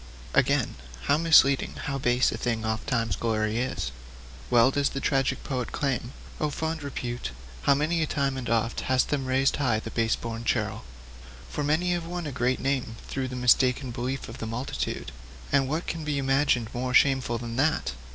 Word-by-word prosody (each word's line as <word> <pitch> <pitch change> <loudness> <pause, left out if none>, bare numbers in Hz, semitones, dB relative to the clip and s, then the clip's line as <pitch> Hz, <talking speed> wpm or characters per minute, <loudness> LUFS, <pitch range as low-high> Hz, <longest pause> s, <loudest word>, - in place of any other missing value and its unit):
'Again, - - +2 0.3
how 145 - +3
misleading, 155 -5 +5
how 140 -1 -2
base, 125 0 +3
a - - -4
thing 115 -2 -1
ofttimes 115 +1 -1
is - - +2
glory! 110 +2 0 0.8
Well 120 +2 +5
does 140 0 +1
the 135 - -4
tragic 135 -1 0
poet 130 -4 -2
exclaim: 130 -3 -2 0.3
'"Oh, 150 - +1
fond 160 +2 -3
Repute, 125 - -4 0.3
how 140 - +4
many 160 +4 +1
a 155 - +1
time 140 -3 0
and 130 -2 -4
oft 115 0 +1
Hast 130 -1 +1
them 135 -3 -1
raised 135 +1 +2
high 130 -6 +2
in 110 - -1
pride - - -16
the - - -6
base 115 -1 +1
born 115 0 -5
churl!" 115 - -1 0.7
For 150 - -2
many 160 +5 +1
have 170 -1 -3
won 175 -1 -4
a 145 - -3
great 125 0 0
name 130 -4 -1
through 135 -1 -2
the 125 - -6
mistaken 125 +1 +3
beliefs 125 +3 -3
of 115 - -9
the 115 - -4
multitude 115 +4 -3 0.4
and 135 -2 +3
what 160 +4 -1
can 165 -1 -4
be 150 -1 -1
imagined 135 -4 +2
more 125 +1 -1
shameful 130 -4 +4
than 115 0 -5
that? 145 - +1
130 Hz, 190 wpm, -27 LUFS, 120-145 Hz, 0.8 s, misleading